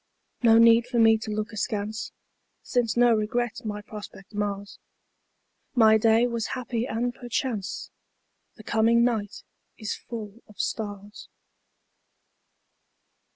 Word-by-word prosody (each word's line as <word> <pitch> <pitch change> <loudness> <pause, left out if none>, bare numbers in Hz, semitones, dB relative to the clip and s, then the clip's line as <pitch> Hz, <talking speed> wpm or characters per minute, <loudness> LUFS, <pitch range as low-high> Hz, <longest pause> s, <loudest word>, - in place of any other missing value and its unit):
No 225 -2 +6
need 230 +1 +6
for 245 -1 -2
me 225 -1 +6
to 220 - -6
look 215 +1 -3
askance, 215 +1 -3 0.5
Since 240 -2 0
no 240 -1 +5
regret 225 +2 -1
my 210 -1 -5
prospect 205 -1 -11
mars. 205 -1 -4 1.0
My 220 -2 +6
day 225 +2 +4
was 235 -2 -2
happy 240 -1 -3
and 245 +1 -1
perchance 240 -4 -4 0.6
The 215 - -13
coming 230 +2 +3
night 220 -4 -1 0.3
is 215 -2 -3
full 225 -1 -8
of 210 - -18
stars. 205 -1 -5
220 Hz, 115 wpm, -26 LUFS, 210-235 Hz, 1.0 s, No